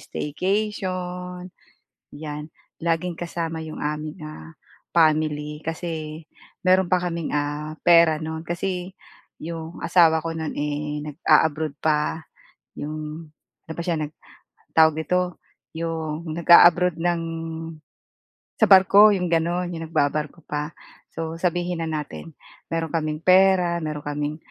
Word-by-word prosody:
staycation, 180 0 -3 0.6
yan. 150 0 -6 0.3
Laging 170 +1 -1
kasama 165 -1 -3
iyong 155 -1 -7
aming, 150 +1 -4
ah, 155 +1 -10 0.4
family 155 -2 +2
kasi 160 -1 -5 0.4
mayroon 185 0 +4
pa 185 - +4
kaming 170 -3 -3
ah, 145 +1 -2
pera 170 -2 +6
noon. 160 0 -4
Kasi 180 +1 -3 0.5
iyong 165 +1 -6
asawa 160 -3 +4
ko 165 - -2
noon 160 -1 -4
eh 150 0 -3
nag-aabroad 155 -1 +2
pa, 155 +1 +1 0.6
iyong 155 +2 -6 0.4
ano 160 - -6
pa - - -2
siya 170 -1 0 0.5
nagtawag 160 0 +3
nito 180 +2 -1 0.4
iyong 165 -1 -3
nag-aabroad 175 0 +6
ng 170 -1 +1 1.4
sa - - +6
barko 195 +2 +8
iyong 180 -2 -1
ganoon, 175 +2 +1
iyong 165 -1 -5
nagbabarko 150 +1 -1
pa. 150 +1 -4 0.4
So 165 0 -4
sabihin 175 -1 -1
na - - -3
natin 155 +1 -6 0.4
mayroon 165 -1 -1
kaming 155 -2 -1
pera, 185 -2 +5
meron 150 -1 -4
kaming 145 +1 -3
165 Hz, 120 wpm, -23 LUFS, 155-175 Hz, 1.4 s, barko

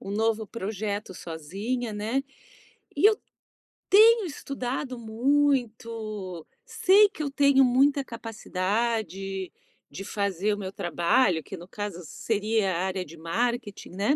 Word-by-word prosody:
um 195 - -6
novo 220 0 0
projeto 205 -2 -4
sozinha, 195 +10 -4
né. 220 +6 -1 0.7
E - - +5
eu 430 0 +4 0.7
tenho 445 +1 +7
estudado 265 -4 -4
muito, 225 - -1 0.2
sei 405 +3 +5
que 315 - -6
eu 285 - -3
tenho 280 -1 +5
muita 275 +3 +3
capacidade 210 -3 -3 0.4
de 195 - -7
fazer 200 0 -1
o - - -3
meu 190 -1 -6
trabalho, 175 0 +2
que 190 - -8
no 175 0 -11
caso 205 -3 -5
seria 210 +2 0
a - - -1
área 185 -1 -2
de 165 +1 -12
marketing, 230 +6 -2
né. 205 +10 +1
220 Hz, 125 wpm, -27 LUFS, 195-255 Hz, 0.7 s, tenho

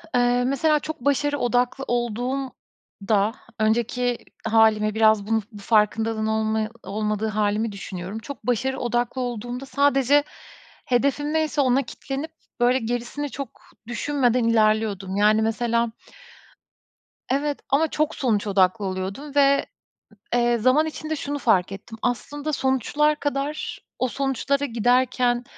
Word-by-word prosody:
Eee, 245 0 +3
mesela 300 +3 +2
çok 315 0 -6
başarı 290 +2 +1
odaklı 245 +2 +1
olduğumda 240 -3 -2 0.3
önceki 235 +2 +1 0.3
hâlime 220 -1 +4
biraz 220 -2 +4
bun 225 0 +1
bu 210 - -11
farkındalığın 220 +1 +1
olma 220 0 0
olmadığı 210 +1 -2
hâlimi 215 +1 0
düşünüyorum. 195 +1 -6
Çok 250 0 -9
başarı 260 +2 0
odaklı 240 +1 -1
olduğumda 245 +2 -4
sadece 280 0 +3 0.6
hedefim 280 +4 +1
neyse 310 -2 +1
ona 260 +1 +3
kitlenip 275 +6 -6 0.3
böyle 245 +2 +3
gerisini 245 +5 -3
çok 275 -4 -7 0.3
düşünmeden 250 -1 +1
ilerliyordum. 215 -4 +1
Yani, 210 +2 +4
mesela. 230 +1 0 1.4
Evet, 285 +1 0
ama 300 +4 +3
çok 305 0 -1
sonuç 215 -5 0
odaklı 195 +1 +2
oluyordum 195 +10 -5
ve, 280 0 +4 0.7
eee, 240 0 +3
zaman 255 +7 +3
içinde 315 0 -4
şunu 290 -1 -3
fark 195 -7 +2
ettim. 225 +3 -9
Aslında 290 +5 -2
sonuçlar 290 +3 +1
kadar 290 +1 -3 0.2
o 255 - +1
sonuçlara 275 +2 -1
giderken 245 0 +2
245 Hz, 120 wpm, -24 LUFS, 220-275 Hz, 1.4 s, hâlime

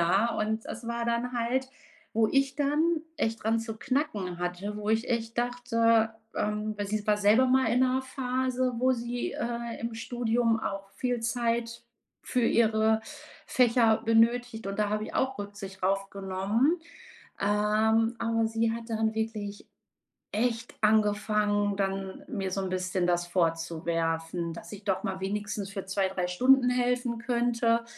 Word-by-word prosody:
Ja, 195 +7 +3
und 220 +1 -1
das 230 +1 -7
war 235 0 -2
dann 235 +1 -1
halt, 250 +3 0 0.5
wo 220 -1 +3
ich 275 0 +2
dann 310 +3 +1 0.2
echt 225 0 -1
dran 225 +1 +2
zu 225 -1 -6
knacken 215 - -1
hatte. 180 +4 -3
Wo 210 0 -5
ich 225 +2 +1
echt 230 -1 -1
dachte, 230 -2 +2 0.2
ähm 210 0 -1
weil 205 - -2
sie 210 0 -2
war 210 - +4
selber 215 +6 +5
mal 260 +1 +3
in 250 - +3
'ner 260 0 +2
Phase, 255 -1 -1
wo 260 +1 +3
sie, 240 0 -3
äh, 235 -1 -4
im 230 0 -3
Studium 230 0 0
auch 195 -1 -4
viel 250 -2 -1
Zeit 235 0 -1 0.4
für 250 - 0
ihre 220 -1 +3 0.5
Fächer 230 -3 +4
benötigt 230 0 +2
und 195 - -5
da 210 -1 +2
habe 215 0 -1
ich - - -8
auch 265 -2 0
Rücksicht 200 -2 -8
drauf 195 +1 +1
genommen. 200 - 0 0.6
Ähm, 215 +3 +2
aber 225 -1 +1
sie 225 0 +1
hat 230 0 -6
dann 220 0 +1
wirklich 215 -2 -4 0.7
echt 230 +2 -1
angefangen, 210 -1 +2
dann 195 +4 -2
mir 195 -7 -3
so 195 - -1
'n 190 - -2
bisschen 185 0 -1
das 175 0 +1
vorzuwerfen, 165 0 -1
dass - - -10
ich 205 0 -9
doch 190 -2 0
mal 190 -1 -2
wenigstens 205 0 -3
für 195 -2 -5
2, 190 0 +1
3 180 -2 -2
Stunden 250 +7 +4
helfen 245 -1 0
könnte. 235 -1 +1
225 Hz, 155 wpm, -28 LUFS, 200-240 Hz, 0.7 s, selber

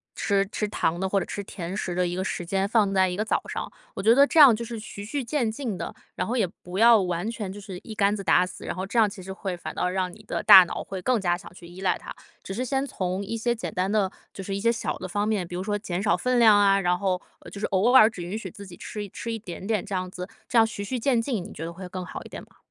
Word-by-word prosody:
吃 200 -1 +1
吃 210 - -1
糖 170 -5 -1
的 190 - 0
或 195 - +2
者 185 - -3
吃 200 - -5
甜 180 -2 -6
食 185 -4 -3
的 180 0 +1
一 175 - -3
个 185 - -2
时 180 - -3
间， 195 +2 0
放 205 -2 +2
在 190 -1 +3
一 180 - -3
个 210 - -1
早 - - +1
上。 - - -5 0.2
我 - - -3
觉 225 +3 +6
得 280 +2 +7
这 325 - +2
样 270 -6 +9
就 235 - -5
是 230 -1 -6
循序渐进 235 0 -3
的， - - -5 0.2
然 - - -2
后 240 - -1
也 210 -6 +2 0.2
不 180 +2 -5
要 230 0 +7
完 180 +2 -2
全 215 -5 -5
就 205 - -8
是 190 -2 -8
一 220 - -8
竿 205 -1 +2
子 200 - -5
打 180 -1 +4
死， 180 - -10
然 - - -3
后 185 +2 -3
这 220 - -4
样 220 - +6
其 200 -1 -10
实 190 - -7
会 190 -1 -4
反 - - -7
倒 - - -1
让 185 0 -1
你 215 +4 -15
的 - - -2
大 205 -3 +11
脑 - - -5
会 190 -1 -6
更 250 +3 +1
加 175 -2 +1
想 185 - -12
去 175 -1 -13
依 175 +2 -11
赖 190 - +1
它。 - - -9 0.3
只 195 - -6
是 240 +6 -2
先 270 +2 0
从 185 -6 -3
一 225 +3 -4
些 235 +2 0
简 225 - -5
单 190 -1 0
的， 205 -3 +1 0.2
就 195 - -7
是 195 +1 -3
一 - - -2
些 230 +3 +3
小 235 - -3
的 185 - -6
方 205 +3 -1
面， 205 -5 0
比 175 - -7
如 180 - -3
说 205 +1 -1
减 180 -3 -3
少 210 - +3
分 250 +7 +1
量 220 -3 +7
啊， 195 -1 +5
然 180 -1 +1
后， 185 -2 0 0.2
呃， - - -12
就 200 - -8
是 - - -1
偶 200 +5 +2
尔 225 -4 +8
只 205 -5 -9
允 180 +5 -4
许 205 -4 -6
自 200 -2 -11
己 175 - -11
吃 210 -1 -6
吃 230 - -6
一 - - -2
点 190 -3 -8
点 210 -2 0
这 205 - -7
样 185 0 -2
子， 180 0 -7 0.2
这 245 - 0
样 225 - +7
循序渐进， 230 +1 -1
你 - - -10
觉 - - -7
得 165 - -5
会 185 +1 -8
更 185 0 -5
好 - - -7
一 - - -12
点 - - -8
吗？ - - -22
200 Hz, 340 characters per minute, -25 LUFS, 185-225 Hz, 0.3 s, 大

